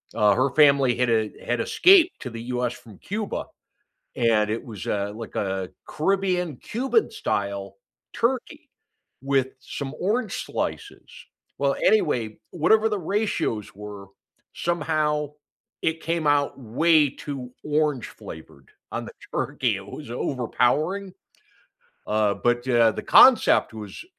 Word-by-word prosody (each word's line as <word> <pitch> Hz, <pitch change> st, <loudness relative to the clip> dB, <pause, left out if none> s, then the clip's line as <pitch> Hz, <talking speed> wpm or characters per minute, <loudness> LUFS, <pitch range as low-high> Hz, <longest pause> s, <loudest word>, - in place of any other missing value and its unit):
uh, 105 Hz, -1 st, +4 dB
her 130 Hz, +2 st, +2 dB
family 140 Hz, -4 st, +5 dB
had 125 Hz, -1 st, +1 dB
e 110 Hz, -2 st, +1 dB
had 120 Hz, -1 st, 0 dB
escaped 365 Hz, -1 st, +5 dB
to 125 Hz, -, -5 dB
the 115 Hz, -1 st, -7 dB
US 125 Hz, -1 st, -1 dB
from 105 Hz, -5 st, -15 dB
Cuba, 210 Hz, +1 st, -4 dB, 0.7 s
and 110 Hz, -3 st, +2 dB
it 110 Hz, -, -2 dB
was, 105 Hz, -5 st, -8 dB
uh, 100 Hz, 0 st, -1 dB
like 115 Hz, 0 st, -9 dB
a 95 Hz, -2 st, -2 dB, 0.2 s
Caribbean-Cuban 195 Hz, -, 0 dB
style 100 Hz, -, -3 dB, 0.4 s
turkey 265 Hz, +5 st, -2 dB, 0.5 s
with 135 Hz, -1 st, +1 dB
some 135 Hz, +1 st, -6 dB
orange 220 Hz, +7 st, 0 dB
slices. -, -, -5 dB, 0.5 s
Well, -, -, +1 dB
anyway, 355 Hz, -, +2 dB
whatever 215 Hz, +7 st, +3 dB
the 210 Hz, -2 st, -1 dB
ratios 180 Hz, -, -2 dB
were, 100 Hz, -1 st, -9 dB, 0.5 s
somehow 155 Hz, -3 st, -1 dB, 0.5 s
it 160 Hz, 0 st, -1 dB
came 165 Hz, -1 st, -2 dB
out 145 Hz, -1 st, +1 dB
way 150 Hz, +5 st, +3 dB
too 135 Hz, -3 st, -7 dB
orange-flavored 145 Hz, -, -3 dB, 0.2 s
on -, -, -4 dB
the -, -, -9 dB, 0.2 s
turkey. -, -, 0 dB
It -, -, -10 dB
was -, -, -9 dB
overpowering. 145 Hz, -, 0 dB, 0.9 s
Uh, 105 Hz, -1 st, +1 dB
but, 120 Hz, +4 st, 0 dB
uh, 120 Hz, -2 st, +5 dB
the -, -, -6 dB
concept -, -, +6 dB
was, 105 Hz, -, -8 dB
135 Hz, 125 wpm, -24 LUFS, 110-175 Hz, 0.9 s, concept